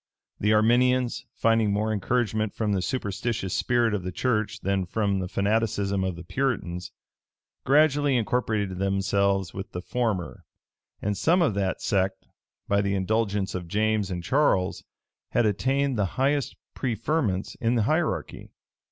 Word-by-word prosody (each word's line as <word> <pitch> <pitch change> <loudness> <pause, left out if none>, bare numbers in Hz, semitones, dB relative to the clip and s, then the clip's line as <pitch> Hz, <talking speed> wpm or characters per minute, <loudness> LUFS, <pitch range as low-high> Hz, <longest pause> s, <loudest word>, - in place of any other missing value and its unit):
The 105 - +2
Arminians, 120 +3 +3
finding 115 -2 +2
more 105 +2 0
encouragement 110 0 0
from 110 -2 -1
the 95 -2 +1
superstitious 105 -2 -2
spirit 120 -2 +2
of 105 - -1
the 90 +1 -4
church 110 +2 -1
than 95 -1 0
from 100 0 0
the 90 - -3
fanaticism 100 -1 0
of 95 -2 -2
the 85 - -9
Puritans, 90 -6 -2 0.7
gradually 145 -1 +4
incorporated 110 -5 -1
themselves 100 0 +1
with 95 0 -7
the 90 - -3
former; 110 -8 -2 0.6
and 105 0 0
some 170 - +3
of 140 - +2
that 95 -2 -2
sect, 95 -1 0 0.4
by 100 0 +2
the 100 0 0
indulgence 100 0 0
of 90 -2 -5
James 105 +1 0
and 90 -2 -4
Charles, 100 - +1 0.5
had 120 - +3
attained 130 +5 +1
the 100 - +2
highest 140 +1 +1 0.2
preferments 120 - -1
in 115 +1 +2
the 115 - +2
hierarchy. 155 - -1
105 Hz, 145 wpm, -26 LUFS, 95-120 Hz, 0.7 s, gradually